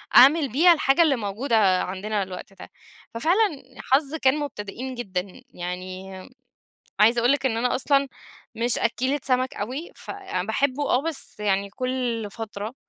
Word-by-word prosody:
أعمل 280 +2 +7
بيها 335 +8 +6
الحاجة 275 -1 +3
اللي 310 -5 +4
موجودة 210 -3 +1
عندنا 200 +2 -2
الوقت 185 +1 -9
ده، - - -12 0.4
ففعلًا 330 - +1 0.3
حظ 285 +2 +3
كان 275 -2 +2
مبتدئين 255 -1 -5
جدًا، 190 -5 -5
يعني 185 +2 -6 0.9
عايزة 230 +3 +5
أقُول 240 +3 +3
لِك 280 -1 0
إن 225 -3 +1
أنا 245 +1 +1
أصلًا 275 +1 +2 0.5
مش 235 +1 +1
أكّيلة 260 +5 0
سمَك 255 0 0
أوي، 260 +11 -5
ف - - -8 0.4
باحبّه 280 +4 0
آه، 250 - +3
بس 325 -9 -4
يعني 200 -1 0
كل 250 -2 -2
فترة 215 0 -6
245 Hz, 145 wpm, -24 LUFS, 205-275 Hz, 0.9 s, أعمل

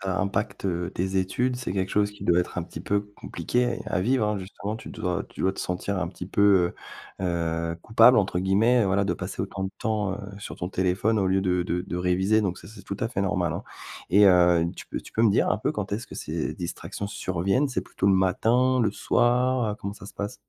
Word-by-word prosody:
ça 95 -2 -2
impacte, 100 +2 -2
heu, 90 -2 -1
tes 95 +2 -1
études, 125 +7 0
c'est 125 -6 -4
quelque 95 -1 -1
chose 105 0 +1
qui 105 - -12
doit 85 0 +4
être 90 - -2
un 90 - -1
petit 80 -1 -8
peu 100 +4 0 0.2
compliqué 120 +9 -1
à - - 0
vivre, 120 +2 +2
hein, 105 - -1
justement. 100 +3 -5
Tu 110 - -10
dois 90 -5 -2
tu - - -11
dois 95 - +2
te - - -14
sentir 90 +2 -2
un 85 - -1
petit 90 0 -8
peu, 95 -3 +4 0.5
heu, - - -2
heu, 85 -1 -1
coupable 120 +3 +6
entre 100 -4 +1
guillemets, 105 +6 +3
voilà, 100 +1 +2
de 100 - 0
passer 95 0 -4
autant 95 -1 -4
de 95 - -3
temps, 105 -3 -1
heu, - - -8 0.2
sur 100 - -7
ton 90 - -4
téléphone 95 +4 +1
au 95 - +1
lieu 95 +1 +2
de 90 -2 +1
de 90 0 -1
de 90 - -5
réviser. 95 +4 +2
Donc, 95 -4 -2
ça, - - -12
c'est 105 -1 -12
tout 100 - -5
à 110 - 0
fait 115 - -3
normal, 90 -4 0
hein. - - -5 0.4
Et 100 +4 +6
heu, 90 -2 +5
tu - - -9
peux - - -5
tu - - -14
peux 110 - +1
me 115 - +5
dire 100 - +2
un - - +1
peu - - -1
quand 105 -2 -4
est-ce 115 +4 -3
que - - -11
ces - - -3
distractions 90 +3 -5
surviennent? 95 - 0
C'est 130 - -1
plutôt - - -3
le 100 - +6
matin, 120 +7 +3
le 105 -4 +1
soir? 125 +3 +2
Heu, - - -4
comment 100 -1 -6
ça 95 - -12
se - - -12
passe? 105 0 -4
95 Hz, 245 wpm, -26 LUFS, 90-105 Hz, 0.5 s, coupable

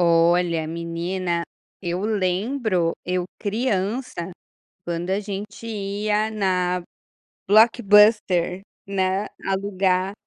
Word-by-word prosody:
Olha, 170 -1 +3
menina, 170 +1 -2 0.4
eu 175 +1 -2
lembro, 200 -2 0
eu 180 0 -1
criança, 205 -3 -2 0.5
quando 170 +1 -3
a 195 +2 +1
gente 205 +2 -7
ia 210 0 -1
na 180 -3 0 0.7
Blockbuster, 210 -4 +5 0.3
né, 190 0 0 0.2
alugar 190 -1 0
190 Hz, 80 wpm, -23 LUFS, 180-210 Hz, 0.7 s, Blockbuster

